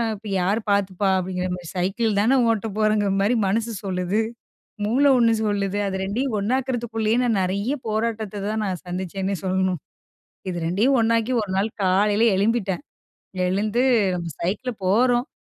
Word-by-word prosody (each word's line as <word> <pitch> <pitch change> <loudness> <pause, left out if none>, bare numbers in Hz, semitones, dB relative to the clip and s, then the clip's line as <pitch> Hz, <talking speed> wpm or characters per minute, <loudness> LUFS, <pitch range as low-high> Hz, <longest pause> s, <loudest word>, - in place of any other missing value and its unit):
இப்போ 210 +1 -11
யார் 200 +5 +1
பார்த்துப்பா 200 -1 +1
அப்படிங்கிற 185 0 -2
மாரி 175 -2 -10
சைக்கிள்தானே 210 +5 +1
ஓட்ட 225 0 0
போறோங்கிற 215 -2 +2
மாதிரி 225 +5 +2
மனசு 225 +4 0
சொல்லுது, 185 +2 -1 0.7
மூளை 270 +6 +3
ஒன்னு 230 -1 +4
சொல்லுது. 200 -1 -1
அது 190 - -3
2யும் 225 +4 -1
ஒன்னாக்கிறதுக்குள்ளயே 235 -1 0
நான் 225 -5 +1
நிறைய 200 +8 -1
போராட்டத்த 215 -2 -2
தான், 215 0 -1
நான் 185 -2 -4
சந்திச்சேன்னே 190 +2 -3
சொல்லணும் 185 -2 0 0.7
இது 175 - -4
2டயும் 220 +10 +2
ஒன்னாக்கி 230 +2 +1
ஒரு 195 - -5
நாள் 200 +3 +1
காலையில் 205 +4 +3
எழும்பிட்டேன். 205 0 0 0.6
எழுந்து 210 +6 0 0.3
நம்ம 170 -1 -4
சைக்கிள்ல 215 +8 -2
போகிறோம் 245 +5 +3
205 Hz, 135 wpm, -23 LUFS, 190-230 Hz, 0.7 s, ஒன்னு